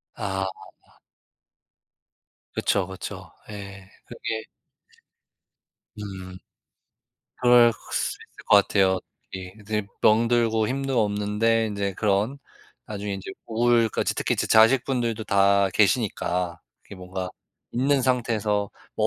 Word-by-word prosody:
아. 95 -3 -2 2.1
그쵸, 100 -3 +1
그쵸. 95 -1 -8 0.2
예. 100 -2 -9 0.2
그게 110 -1 -5 1.6
음. 95 -2 -7 1.1
그럴 120 -1 +7 0.2
수 - - 0
있을 - - -16
것 105 - +8
같아요 95 -2 +3 0.3
이게. 95 0 -7
이제 105 -1 -3
병들고 115 0 +3
힘도 135 -2 0
없는데 105 +2 +1
인제 100 -2 -2
그런 105 +6 0 0.5
나중에 105 -1 -4
인제 95 - -7 0.2
우울까지, 115 0 +2
특히 - - 0
이제 - - -1
자식분들도 115 -1 +3
다 100 0 +4
계시니까. 90 -4 +1 0.2
이게 - - -11
뭔가 90 0 -5 0.4
있는 135 +3 +2
상태에서 110 -5 0 0.2
뭐 - - +2
105 Hz, 215 characters per minute, -25 LUFS, 100-115 Hz, 2.1 s, 것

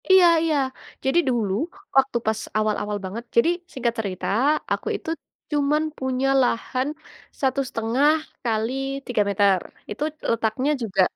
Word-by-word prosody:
Iya 375 -1 +8 0.2
iya, 320 -2 +2 0.5
jadi 270 +6 +4
dulu 225 -6 +1 0.4
waktu 270 -2 +4
pas 220 0 +1 0.2
awal-awal 210 -1 0
banget 210 +5 -5
jadi 235 +8 +5 0.2
singkat 240 -5 -1
cerita 195 -4 -3 0.5
aku - - -4
itu, - - -8 0.4
cuman 295 +1 +2
punya 260 0 0
lahan, 255 +2 0 0.5
1,5 260 0 +2 0.3
kali 225 +1 0 0.3
3 245 -4 +1
meter 200 -1 +4 0.3
itu 210 - -3 0.3
letaknya 230 +5 +1
juga, 195 -4 +1
240 Hz, 125 wpm, -24 LUFS, 215-270 Hz, 0.5 s, Iya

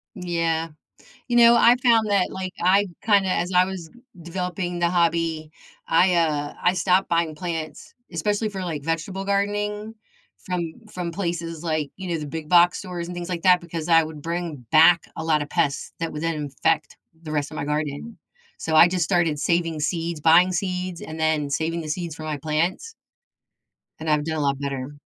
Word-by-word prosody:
Yeah. 165 -3 -1 0.6
You 240 - -1
know, 235 0 +7
I've 240 +2 +5
found 225 -3 +4
that, 200 -3 +2
like, 185 -1 -5
I 195 +3 +4 0.2
kinda 200 -3 +3
as 180 0 0
I 180 0 +5
was 185 -4 -7 0.3
developing 180 0 -4
the 170 0 +2
hobby, 165 -3 0 0.4
I, 185 - +4
uh, 150 -3 0
I 180 - +4
stopped 185 +2 +2
buying 165 -2 0
plants, 165 -2 -6 0.2
especially 205 +6 0
for, 195 -2 -6
like, 155 -5 -4
vegetable 165 +5 -3
gardening, 205 +2 -1 0.4
from 175 -3 -4 0.2
from 180 -4 -4
places, 170 -2 -4
like, 155 -3 -2
you 190 -2 -6
know, 165 - 0
the 150 -1 -6
big 155 +1 -6
box 175 0 +5
stores, 175 -3 -6
and 180 - -6
things 175 0 -5
like 170 -2 -3
that, 180 -1 +6
because 170 -1 -6
I 165 -1 +6
would 155 -2 -8
bring 165 -6 -4
back 165 +1 +6
a 160 - -4
lotta 155 -2 +1
pests 140 -1 -1
that 165 -1 -3
would 150 +2 -5
then 165 0 0
infect 150 +1 -1 0.2
the 155 -2 -8
rest 150 -1 -2
of - - -8
my 145 - -3
garden. 150 +8 -3 0.4
So 160 - -2
I 170 +3 +8
just 180 -1 0
started 165 -3 +1
saving 165 0 0
seeds, 165 0 -2
buying 175 +3 +6
seeds, 180 -1 -3
and 160 0 -7
then 155 -2 +1
saving 165 +4 -1
the 155 - -7
seeds 170 0 -4
from 155 - -8
my 155 -2 -3
plants 165 - -2 1.0
and 160 0 -4
I've 150 -1 +2
done 160 -1 -2
a - - -1
lot 140 -1 0
better. 140 0 -4
170 Hz, 190 wpm, -23 LUFS, 155-185 Hz, 1.0 s, I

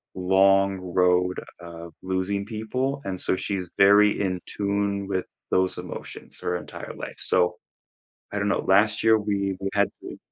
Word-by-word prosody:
long 95 +1 +3
road 90 0 +2 0.2
of 85 -1 -10
losing 95 +2 -1
people, 130 +6 -3
and 95 -1 -4
so - - +1
she's 95 -3 -3
very 100 +1 +6
in 95 -2 -1 0.2
tune 100 -1 -1
with 95 -2 -2 0.3
those 95 0 +2
emotions - - -8
her 90 0 -1
entire - - -8
life, - - -7
so 90 -1 +2 0.8
I 105 - -1
don't 100 0 0
know, - - 0
last 105 +2 +3
year 110 0 +6
we 100 -2 -1
we 100 - -1
had 100 -1 +3
to - - -8
100 Hz, 155 wpm, -25 LUFS, 90-100 Hz, 0.8 s, very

